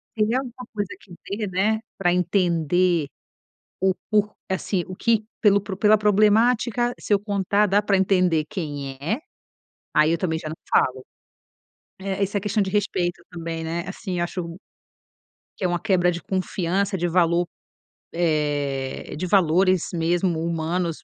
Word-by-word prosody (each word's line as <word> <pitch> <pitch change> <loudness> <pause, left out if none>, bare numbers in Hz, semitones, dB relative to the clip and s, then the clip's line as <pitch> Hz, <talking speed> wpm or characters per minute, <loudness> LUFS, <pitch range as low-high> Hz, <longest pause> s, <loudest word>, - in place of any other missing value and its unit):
Teria 220 +3 +2
alguma 250 -1 -8
coisa 205 -2 -2
que 190 -3 -16
dê, 210 +2 -2
né, 205 +4 +1 0.2
pra 180 -2 +2
entender 175 -2 +2 0.7
o 190 -1 +3 0.2
por 210 -1 +2 0.2
assim, 190 -1 -1
o 185 - -7
que 225 -1 +1 0.2
pelo 200 -2 +5
pro 195 -1 -6
pela 210 +2 +5
problemática, 225 +3 +3
se 210 - -1
eu 200 - +4
contar, 205 0 +1
dá 200 +2 +3
para 200 -1 +2
entender 180 -5 +2
quem 145 -6 -4
é, 170 - -2 0.7
aí 155 +1 +4
eu 170 - +2
também 160 -4 -1
já 155 -1 -6
não 160 - -5
falo. 130 0 +2 1.0
Eh, 195 +1 -2
isso 200 +1 -1
é - - +1
questão 210 +1 0
de 190 - -2
respeito 185 -4 -1
também, 165 -1 -5
né, 170 +2 -3
assim, 195 -2 -5
eu 175 - +1
acho 170 -1 -5 1.0
que 190 - -2
é - - +4
uma 175 -1 -1
quebra 180 -1 +2
de 170 - -5
confiança, 190 +1 -1
de 175 -1 0
valor, 170 0 +2 0.6
eh, 145 -6 -1
de 180 +4 -3
valores 185 0 +3
mesmo 170 0 +1
humanos 170 0 -2
185 Hz, 155 wpm, -23 LUFS, 170-205 Hz, 1.0 s, pelo